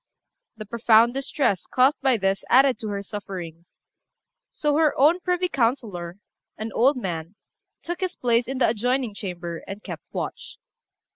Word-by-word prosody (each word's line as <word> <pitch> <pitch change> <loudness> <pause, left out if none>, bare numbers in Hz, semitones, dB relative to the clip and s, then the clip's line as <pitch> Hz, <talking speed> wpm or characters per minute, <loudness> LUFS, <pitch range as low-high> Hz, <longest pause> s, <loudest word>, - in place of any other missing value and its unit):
The 215 - -7
profound 230 +1 +4
distress 270 - -1
caused 260 +3 +3
by 265 -3 +3
this 195 -1 0
added 265 0 +5
to 220 - -5
her 200 -1 -3
sufferings; 175 -5 -8 0.7
so 295 -1 0
her 310 -2 +3
own 310 +6 +5
privy 360 0 0
councillor, 225 - -1 0.4
an 220 +1 -5
old 265 +4 +3
man, 175 -4 -5 0.5
took 345 0 -4
his 370 -1 -2
place 235 -1 +1
in 265 +1 -3
the 255 - +3
adjoining 245 +1 0
chamber, 175 -4 -5
and 200 +2 -8
kept - - -7
watch. - - -5
235 Hz, 150 wpm, -24 LUFS, 195-270 Hz, 0.7 s, added